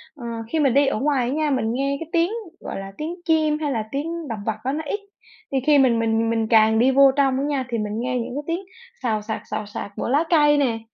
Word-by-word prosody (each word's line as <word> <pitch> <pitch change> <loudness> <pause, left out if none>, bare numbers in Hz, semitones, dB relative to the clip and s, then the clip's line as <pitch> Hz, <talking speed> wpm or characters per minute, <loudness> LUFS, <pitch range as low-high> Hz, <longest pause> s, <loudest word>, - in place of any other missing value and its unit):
ờ, 245 - -9 0.3
khi 320 - +1
mình 275 -5 +3
đi 280 +1 +4
ở 240 - 0
ngoài 270 -3 +1
á - - -1
nha, 310 -1 +1
mình 255 -5 0
nghe 275 +2 -1
cái 330 -1 -7
tiếng, 340 +3 +2 0.3
gọi - - -6
là, 195 0 -7
tiếng 320 +3 -4
chim 310 -2 +2
hay 295 -2 -1
là 225 -4 -1
tiếng 325 +3 -4
động 220 -2 -4
vật 220 -1 -1
á 260 - 0
nó 315 - -3
ít, 410 - -2 0.5
thì 270 - 0
khi 295 - +6
mình 250 -4 +4
mình 225 0 +1
mình 225 -1 0
càng 220 -1 +5
đi 255 +3 +4
vô 275 0 +6
trong 270 -2 +3
á 275 - -1
nha 280 -3 -1
thì 235 - -1
mình 210 -1 -3
nghe 250 +1 -1
những 240 +1 -5
tiếng 335 +2 -1 0.4
xào 220 -3 0
xạc, 220 +1 -4
xào 210 - -2
xạc 205 0 -7
của - - -3
lá 290 +5 +3
cây 295 -3 +5
nè, 240 -6 +1
265 Hz, 265 wpm, -22 LUFS, 230-295 Hz, 0.5 s, khi